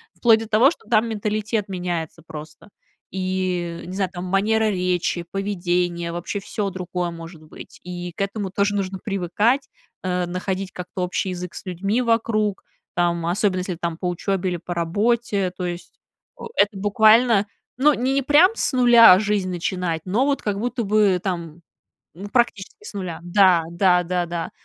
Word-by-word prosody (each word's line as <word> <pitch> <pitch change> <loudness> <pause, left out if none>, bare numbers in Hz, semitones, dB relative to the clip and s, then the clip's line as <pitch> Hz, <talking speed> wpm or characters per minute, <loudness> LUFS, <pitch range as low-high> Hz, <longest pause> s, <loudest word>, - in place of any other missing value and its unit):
вплоть 225 -2 +4
до 225 - -6
того, 230 +7 +5
что - - -11
там 225 0 +3
менталитет 215 0 -2
меняется 175 -3 -4
просто. 155 +3 -10 0.4
И 185 -2 -2
не 180 - -7
знаю, 190 -2 0
там, 175 - -5
манера 215 +4 +2
речи, 180 -2 -1
поведение, 175 -3 -1
вообще 175 +4 -4
всё 205 0 -3
другое 180 -1 -4
может 165 -1 -10
быть. 155 - -13
И 175 0 -6
к - - -5
этому 200 0 -2
тоже 200 +1 0
нужно 190 -1 -3
привыкать, 205 +7 0 0.3
а, 180 -1 -1
находить 185 +2 -3
как-то 180 +1 -6
общий 180 +1 -2
язык 180 -1 -6
с - - -9
людьми 195 +7 -1
вокруг. 220 -3 0 0.3
Там, 170 -1 0
особенно 185 +2 +1
если 180 -1 -4
там 170 -1 -4
по 180 - -3
учёбе 185 +1 -1
или 175 - -2
по 175 +1 -6
работе. 200 +3 0
То 180 - -3
есть, 175 0 -7 0.4
э, - - -9
это 205 0 +3
буквально, 215 +2 +4 0.3
ну, 295 +3 +5
ни 255 +1 -1
не 275 +1 +2
прям 295 - +5
с - - 0
нуля 240 -6 +8
жизнь 210 -3 0
начинать, 175 -2 -2
но 210 +8 +1
вот 285 0 0
как 205 -1 -2
будто 240 +1 -2
бы 205 -3 +3
там 170 -3 -4 0.6
ну 200 +2 -7
практически 240 - -1
с 425 - -9
нуля. 185 -4 -5
Да 180 -1 +4
да 180 0 +3
да 180 0 -1
да. 170 -1 -4
190 Hz, 170 wpm, -22 LUFS, 175-215 Hz, 0.6 s, нуля